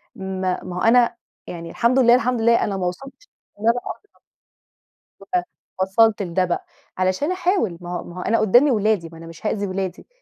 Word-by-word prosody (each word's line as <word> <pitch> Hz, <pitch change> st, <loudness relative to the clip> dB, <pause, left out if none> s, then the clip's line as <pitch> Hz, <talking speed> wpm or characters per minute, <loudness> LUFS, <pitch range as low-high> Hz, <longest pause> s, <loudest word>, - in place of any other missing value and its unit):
ما 190 Hz, -1 st, -3 dB
ما 180 Hz, -1 st, -7 dB
هو 180 Hz, -, -3 dB
أنا 235 Hz, +1 st, +4 dB, 0.3 s
يعني 170 Hz, -1 st, -7 dB
الحمد 245 Hz, +3 st, +2 dB
لله، 240 Hz, -1 st, +6 dB
الحمد 250 Hz, -1 st, 0 dB
لله 235 Hz, +1 st, +4 dB
أنا 195 Hz, -, -2 dB
ما 185 Hz, -, -2 dB
وصَلتش 270 Hz, -, -8 dB, 0.3 s
إن -, -, -10 dB
أنا -, -, +8 dB
أضرَب. 420 Hz, -, -9 dB, 1.2 s
أ 175 Hz, -, +2 dB, 0.4 s
وصَلت 210 Hz, +3 st, +3 dB
لده 185 Hz, 0 st, 0 dB
بقى 175 Hz, -, -3 dB, 0.3 s
علشان 185 Hz, -, 0 dB
أحاول، 360 Hz, -, 0 dB
ما 175 Hz, -, -8 dB
هو -, -, -6 dB
ما 175 Hz, +1 st, -11 dB
هو -, -, -4 dB
أنا 230 Hz, +4 st, +1 dB
قُدّامي 245 Hz, +7 st, +5 dB
ولادي، 210 Hz, -6 st, +1 dB
ما 165 Hz, -, -12 dB
أنا 165 Hz, -, -11 dB
مش 165 Hz, +5 st, -13 dB
هأذي 205 Hz, -1 st, -1 dB
ولادي، 185 Hz, -1 st, -4 dB
200 Hz, 195 wpm, -22 LUFS, 180-235 Hz, 1.2 s, أنا